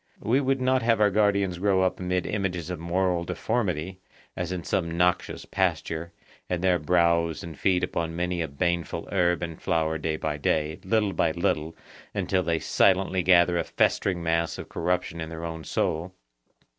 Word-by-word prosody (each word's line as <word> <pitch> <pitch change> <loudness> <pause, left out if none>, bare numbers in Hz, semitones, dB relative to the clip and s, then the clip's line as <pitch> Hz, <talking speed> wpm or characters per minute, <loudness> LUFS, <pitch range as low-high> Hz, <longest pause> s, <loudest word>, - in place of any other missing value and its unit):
We 125 +6 +2
would 135 0 +1
not 130 0 +2
have 115 -1 +2
our 105 -1 +4
guardians 100 -3 +2
grow 95 -1 +3
up 95 - 0
amid 90 -1 -1
images 90 -4 -2
of 90 - -4
moral 90 +1 0
deformity, 90 -2 -2 0.4
as 90 0 -3
in 90 -2 -3
some 85 -1 -1
noxious 90 0 +1
pasture, 85 -2 -1 0.4
and 90 0 -2
there 90 -2 +3
browse 85 0 +2
and 85 -2 -8
feed 90 +3 +1
upon 80 -1 -2
many 90 0 -1
a 80 - -1
baneful 85 +3 -2
herb 90 -3 +2
and 85 -2 -6
flower 80 -3 0
day 80 0 -1
by 75 -1 -2
day, 75 +1 0
little 105 0 +1
by 80 - +1
little, 80 -2 -1 0.4
until 95 -1 +1
they 85 -2 0
silently 95 +2 +2
gather 85 0 +4
a - - +1
festering 90 -3 0
mass 85 0 0
of - - -8
corruption 85 0 -1
in 80 - -5
their 80 +1 -6
own 80 -1 -5
soul. 85 +5 -2
90 Hz, 175 wpm, -26 LUFS, 85-95 Hz, 0.4 s, our